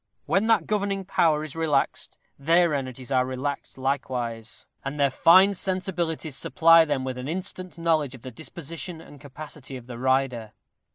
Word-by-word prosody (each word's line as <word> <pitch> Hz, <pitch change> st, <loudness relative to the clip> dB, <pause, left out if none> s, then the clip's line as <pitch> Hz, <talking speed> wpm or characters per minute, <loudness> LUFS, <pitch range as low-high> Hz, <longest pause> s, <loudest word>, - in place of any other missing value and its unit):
When 200 Hz, +3 st, +1 dB
that 220 Hz, -8 st, +3 dB
governing 200 Hz, -2 st, -1 dB
power 155 Hz, -4 st, +2 dB
is 155 Hz, -1 st, -7 dB
relaxed, 155 Hz, -4 st, -1 dB, 0.2 s
their 165 Hz, +3 st, +3 dB
energies 130 Hz, -1 st, -5 dB
are 130 Hz, -1 st, +3 dB
relaxed 130 Hz, +3 st, -4 dB
likewise; 125 Hz, -4 st, -3 dB, 0.2 s
and 140 Hz, +2 st, -5 dB
their 140 Hz, -1 st, +3 dB
fine 185 Hz, +8 st, +6 dB
sensibilities 175 Hz, -5 st, -2 dB
supply 165 Hz, 0 st, +5 dB
them 145 Hz, -4 st, -1 dB
with 130 Hz, -1 st, -4 dB
an 125 Hz, -, -5 dB
instant 185 Hz, +1 st, -4 dB
knowledge 160 Hz, -5 st, +1 dB
of 125 Hz, -, -15 dB
the 130 Hz, -, -7 dB
disposition 165 Hz, +4 st, -7 dB
and 145 Hz, -3 st, -14 dB
capacity 140 Hz, -1 st, -9 dB
of 120 Hz, -, -12 dB
the 120 Hz, -1 st, -8 dB
rider. 130 Hz, -4 st, 0 dB
150 Hz, 160 wpm, -25 LUFS, 130-170 Hz, 0.2 s, fine